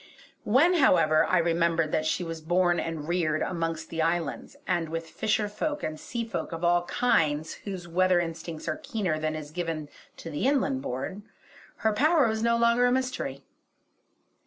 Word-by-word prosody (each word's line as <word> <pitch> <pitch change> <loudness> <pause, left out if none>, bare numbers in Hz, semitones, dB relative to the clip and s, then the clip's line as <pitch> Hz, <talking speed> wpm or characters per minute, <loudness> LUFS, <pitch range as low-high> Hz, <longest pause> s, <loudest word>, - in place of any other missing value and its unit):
When, 285 +11 +4
however, 170 - +4
I 185 - +2
remembered 165 -1 +1
that 155 0 0
she 180 - 0
was 165 -1 -6
born 175 +2 +2
and 160 -2 -4
reared 165 -3 0
amongst 165 -2 -3
the 165 - -1
islands, 165 - -1
and 165 -2 0
with 165 0 -4
fisher 210 +4 0
folk 295 +8 -3
and 155 0 -4
sea 235 -1 -4
folk 225 - -4
of 165 +1 -6
all 175 0 +2
kinds 155 -10 +1
whose 185 -4 -5
weather 185 +1 +3
instincts 165 -1 -5
are - - -1
keener 220 - -2
than 155 0 -1
is 150 -1 -7
given 165 -3 -4 0.3
to 165 - -8
the 150 - 0
inland 275 -1 +1
born, 185 - -5 0.6
her 220 - +4
power 300 +3 +4
was 220 0 -1
no 235 0 +3
longer 235 +1 +4
a - - +2
mystery. 250 - -2
175 Hz, 175 wpm, -27 LUFS, 160-225 Hz, 0.6 s, When